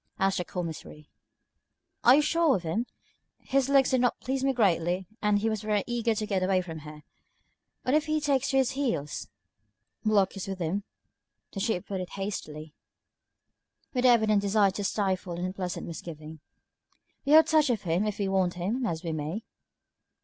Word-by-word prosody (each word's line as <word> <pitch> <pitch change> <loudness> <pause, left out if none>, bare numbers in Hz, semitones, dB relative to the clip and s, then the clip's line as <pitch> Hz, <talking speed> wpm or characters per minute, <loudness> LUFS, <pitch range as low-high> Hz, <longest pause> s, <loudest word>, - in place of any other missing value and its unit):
asked 195 -1 +1
the - - -1
Commissary. 160 -4 -7 0.9
"Are 250 - +8
you 300 - +4
sure 330 -1 +3
of 185 - -3
him? 215 +9 -2 0.5
His 275 0 0
looks 275 -2 +4
did 260 -1 +3
not 245 - +1
please 265 +1 -2
me 270 - +3
greatly, 185 -6 +1 0.2
and 210 -1 +3
he 210 +2 0
was 220 -2 -1
very 210 -2 0
eager 235 -2 0
to 215 - -2
get 195 -3 -1
away 185 0 +2
from 165 -3 -7
here. 150 0 -11 0.8
What 255 - 0
if 305 +1 +2
he 310 0 +1
takes 275 -3 +1
to 270 - +2
his 265 -2 +3
heels?" 235 - -2 0.7
"Block 210 -3 +2
is 195 - -5
with 195 -1 -4
him," 185 +4 -2 0.7
the 195 - -6
Chief 195 -3 -1
put 190 -2 -4
in 180 - -5
hastily, 155 -7 -6 1.2
with 250 -2 0
the - - +8
evident 220 -3 +4
desire 200 0 +3
to 200 +2 -4
stifle 190 -3 -1
an 175 +1 -3
unpleasant 185 -1 -4
misgiving. 160 -1 -8 0.8
"We 285 - +2
have 315 0 +9
touch 310 -3 +3
of 230 -5 0
him 175 +5 0
if 210 - -3
we 200 - -1
want 190 -2 +1
him, 220 +8 -1
as 165 -3 -3
we 165 - -2
may." 155 +7 -4
200 Hz, 185 wpm, -28 LUFS, 180-245 Hz, 1.2 s, have